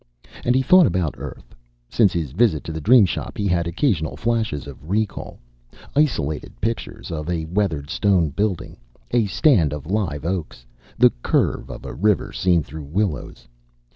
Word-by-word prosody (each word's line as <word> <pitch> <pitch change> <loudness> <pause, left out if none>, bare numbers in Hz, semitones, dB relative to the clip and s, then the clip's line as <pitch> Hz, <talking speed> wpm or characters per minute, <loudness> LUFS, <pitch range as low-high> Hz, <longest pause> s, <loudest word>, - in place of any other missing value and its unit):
And 125 - +2
he 130 - +3
thought 180 +4 +6
about 85 -4 0
Earth. - - -9 0.3
Since 105 - +3
his 80 -6 -2
visit 95 - +2
to - - -6
the 80 0 -5
Dream 115 - +6
Shop, - - -4
he 105 - -1
had 85 -3 +1
occasional 85 - 0
flashes 110 - -1
of 70 +2 -11
recall, 105 +1 -2 0.6
isolated 80 - 0
pictures 115 +1 -4
of 75 0 -4
a 85 -2 -1
weathered 80 -5 -1
stone 90 -7 +2
building, 100 +1 -2 0.3
a 120 -3 +2
stand 95 - +3
of 75 -1 -6
live 85 -6 -2
oaks, 85 -9 -4 0.3
the - - +6
curve - - 0
of - - -8
a - - -6
river 100 - +1
seen 90 -3 +2
through 75 0 -9
willows. 80 - -3
90 Hz, 165 wpm, -22 LUFS, 75-105 Hz, 0.6 s, thought